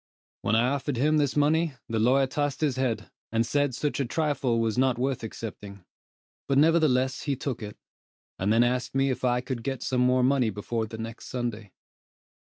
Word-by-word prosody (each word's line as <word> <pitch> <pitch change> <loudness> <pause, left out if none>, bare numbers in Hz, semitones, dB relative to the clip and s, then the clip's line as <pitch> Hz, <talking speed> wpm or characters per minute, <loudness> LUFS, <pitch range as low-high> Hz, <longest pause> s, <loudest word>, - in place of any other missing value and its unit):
When 110 - +1
I 120 +3 +3
offered 140 -1 -2
him 155 +5 +3
this 145 -3 +1
money, 155 +1 +2
the 115 -1 -1
lawyer 130 +5 +4
tossed 145 +2 -2
his 145 -5 +1
head, 120 -5 -2 0.2
and 115 +1 +1
said 145 +1 0
such 145 +2 -2
a 140 - +1
trifle 135 -4 0
was 110 -2 0
not 130 -1 +2
worth 130 +1 -1
accepting; 105 -3 -8 0.6
but 140 - +2
nevertheless 145 -4 +3
he 140 - -1
took 130 -2 -4
it, 105 -1 -7 0.6
and 95 +3 +1
then 115 +2 +5
asked 125 +2 -1
me 135 0 +2
if 130 - -4
I 125 -1 +2
could 130 -2 -4
get 135 +1 -3
some 125 -1 0
more 125 0 +3
money 130 -3 +3
before 110 +2 -3
the 110 - -8
next 115 +1 -7
Sunday. 115 -5 -4
125 Hz, 195 wpm, -27 LUFS, 115-140 Hz, 0.6 s, then